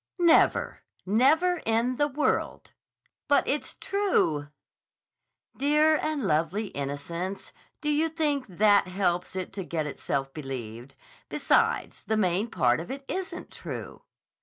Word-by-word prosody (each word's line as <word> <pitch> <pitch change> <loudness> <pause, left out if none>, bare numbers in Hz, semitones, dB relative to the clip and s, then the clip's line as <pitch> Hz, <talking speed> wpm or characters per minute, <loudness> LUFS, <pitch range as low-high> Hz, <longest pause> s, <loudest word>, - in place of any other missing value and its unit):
"Never. 340 -2 +3 0.2
Never 310 - +3
in 230 +3 +1
the 290 - +3
world!" 295 +1 -1 0.6
"But 285 - +3
it's 290 +2 -2
true!" 270 - 0 1.1
"Dear 300 +3 +4
and 310 -3 -2
lovely 180 +5 0
innocence! 170 +7 -5 0.3
Do 300 - -1
you 305 +2 +2
think 295 -4 -1
that 205 +1 +4
helps 180 -1 -1
it 185 0 -4
to 195 -1 -4
get 165 -3 -2
itself 135 -1 -3
believed? 130 -3 -7 0.3
Besides, - - +1
the 220 +1 0
main 195 +2 +1
part 125 - +2
of 165 - -7
it 275 +1 -6
isn't 380 0 -5
true." - - -7
210 Hz, 125 wpm, -27 LUFS, -, 1.1 s, Dear